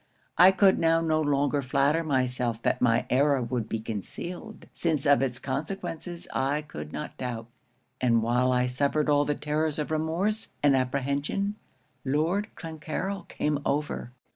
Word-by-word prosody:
I 180 +3 +8
could 190 0 +4
now 165 0 +4
no 160 -1 +1
longer 145 -1 +1
flatter 140 +5 +2
myself 125 -5 0
that - - +1
my 115 -1 +3
error 140 +2 +4
would 120 -2 -2
be 110 - -1
concealed, 170 - -6
since 160 -5 -1
of 145 -1 +5
its 125 -2 -1
consequences 165 +5 -5
I 140 +3 0
could 75 - -8
not 150 - -6
doubt; 120 -3 -4 0.6
and 115 -3 +3
while 125 +2 +2
I 125 0 +2
suffered 140 +4 +1
all 145 0 +4
the 150 - 0
terrors 150 +1 -1
of 150 0 -3
remorse 170 +8 -1
and 145 -2 +5
apprehension, 140 +9 -1 0.5
Lord 160 +9 +1
Clancarryl 165 +4 -4
came 150 -1 -1
over. 145 -4 -2
145 Hz, 150 wpm, -27 LUFS, 125-160 Hz, 0.6 s, I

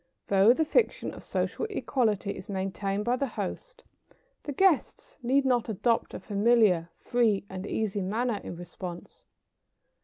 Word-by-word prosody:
Though 200 +3 +6
the 315 +6 +2
fiction 445 +9 +1
of - - -11
social 450 - -2
equality 220 - 0
is 185 0 -9
maintained 195 +1 -2
by 245 +1 +2
the 275 - -1
host, - - -6 0.6
the 290 - -5
guests 380 - +1
need 270 +3 +2
not 245 -3 +2
adopt 225 +3 0
a - - -5
familiar, 205 -5 +3
free 225 -5 +1
and 190 +1 -5
easy 210 -2 -1
manner 215 +3 -1
in - - -6
response. 175 0 -9
220 Hz, 145 wpm, -28 LUFS, 195-255 Hz, 0.6 s, Though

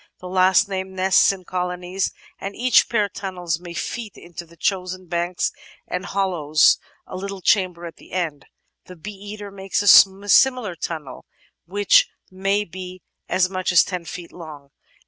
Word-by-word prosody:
The 180 - -9
last 185 +1 +4
named 190 -1 -4
nests 190 +1 +4
in 190 -2 -8
colonies, 180 +1 -3 0.3
and 195 +1 -6
each 245 -2 +4
pair 210 -3 +1
tunnels 180 -5 -4
many 175 -1 -9
feet 225 0 -5
into 175 0 -10
the 170 +1 -19
chosen 185 -1 -2
bank 175 +1 -3 0.5
and 180 +2 -4
hollows 170 -7 +3 0.3
a - - -9
little 195 +1 -5
chamber 180 -2 +1
at 165 - -9
the - - -18
end; 165 -6 -3 0.4
the 180 - -11
Bee 180 +5 -8
eater 205 0 -9
makes 195 0 -2
a 195 0 +7
similar 250 -3 +4
tunnel, 155 -6 -6 0.4
which 205 - +4 0.2
may 195 +2 0
be 185 +1 -9 0.3
as 185 0 +2
much 185 -1 -2
as 180 - +6
ten 180 -3 -5
feet 170 0 -8
long. 150 -5 -11
185 Hz, 160 wpm, -22 LUFS, 175-195 Hz, 0.5 s, a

